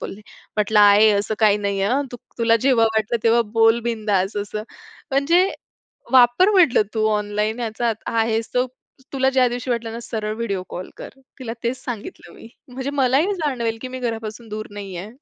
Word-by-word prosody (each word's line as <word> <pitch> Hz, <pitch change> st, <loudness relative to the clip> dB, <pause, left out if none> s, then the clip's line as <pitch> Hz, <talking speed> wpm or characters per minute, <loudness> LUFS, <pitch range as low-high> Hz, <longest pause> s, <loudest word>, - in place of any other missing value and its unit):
बोलले. 195 Hz, -, -7 dB, 0.4 s
म्हटलं 210 Hz, 0 st, +2 dB
"आई 205 Hz, +1 st, +7 dB
असं 210 Hz, +1 st, 0 dB
काही 210 Hz, -2 st, +4 dB
नाहीये 200 Hz, -1 st, -1 dB
हां, 265 Hz, +5 st, +1 dB
तू -, -, -5 dB, 0.2 s
तुला 230 Hz, -1 st, +4 dB
जेव्हा 255 Hz, -4 st, +4 dB
वाटलं 220 Hz, +1 st, -1 dB
तेव्हा 230 Hz, +1 st, +4 dB
बोल 225 Hz, +1 st, +4 dB
बिनधास्त" 210 Hz, -4 st, -1 dB
असं. 210 Hz, +1 st, -4 dB, 0.5 s
म्हणजे 330 Hz, +8 st, +3 dB, 0.7 s
वापर 250 Hz, -, +6 dB
म्हटलं, 355 Hz, -, +5 dB
तू 220 Hz, -1 st, 0 dB
ऑनलाईन 210 Hz, +2 st, -1 dB
याचा 230 Hz, 0 st, -1 dB, 0.2 s
आहेस 225 Hz, 0 st, 0 dB
तो 250 Hz, 0 st, +2 dB, 0.5 s
तुला 265 Hz, -1 st, +2 dB
ज्या 260 Hz, -1 st, +3 dB
दिवशी 245 Hz, +1 st, -5 dB
वाटलं 235 Hz, -1 st, -2 dB
ना, 230 Hz, -, -5 dB
सरळ 215 Hz, -2 st, -4 dB
व्हिडिओ 200 Hz, -5 st, -3 dB
कॉल 180 Hz, -, -7 dB
कर. -, -, -8 dB, 0.3 s
तिला 230 Hz, -3 st, -5 dB
तेच 240 Hz, +2 st, -3 dB
सांगितलं 245 Hz, -, -7 dB
मी. -, -, -13 dB, 0.2 s
म्हणजे 260 Hz, +2 st, -4 dB
मलाही 275 Hz, +10 st, +2 dB
जाणवेल, 245 Hz, -9 st, -2 dB
की 255 Hz, -, -5 dB
मी 255 Hz, 0 st, -7 dB
घरापासून 225 Hz, -1 st, -5 dB
दूर 215 Hz, +1 st, -5 dB
नाहीये. 195 Hz, -1 st, -7 dB
230 Hz, 175 wpm, -21 LUFS, 210-250 Hz, 0.7 s, आई